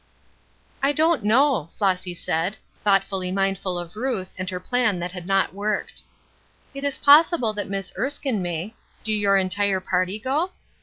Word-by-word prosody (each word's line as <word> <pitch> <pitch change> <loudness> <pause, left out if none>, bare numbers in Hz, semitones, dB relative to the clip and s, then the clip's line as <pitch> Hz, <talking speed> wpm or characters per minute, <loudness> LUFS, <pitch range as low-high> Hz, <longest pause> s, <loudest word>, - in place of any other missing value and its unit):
"I 275 +1 +2
don't 320 -4 +2
know," 235 - +3
Flossy 185 -3 0
said, 170 +5 -2 0.3
thoughtfully 195 -2 +1
mindful 195 -1 -1
of 175 +1 -7
Ruth 220 -5 -3
and 185 0 -4
her 180 -1 -4
plan 235 0 +1
that 175 0 -4
had 180 -1 -8
not 195 -1 +2
worked. 210 +2 -3 0.7
"It 275 0 -7
is 285 -1 -1
possible 290 -5 +5
that 205 -1 -4
Miss 195 -1 -3
Erskine 270 -5 -1
may. 175 +4 -4 0.3
Do 220 - -1
your 200 -2 +3
entire 195 +1 +1
party 185 +2 -1
go?" 285 - -1
200 Hz, 155 wpm, -23 LUFS, 185-250 Hz, 0.7 s, possible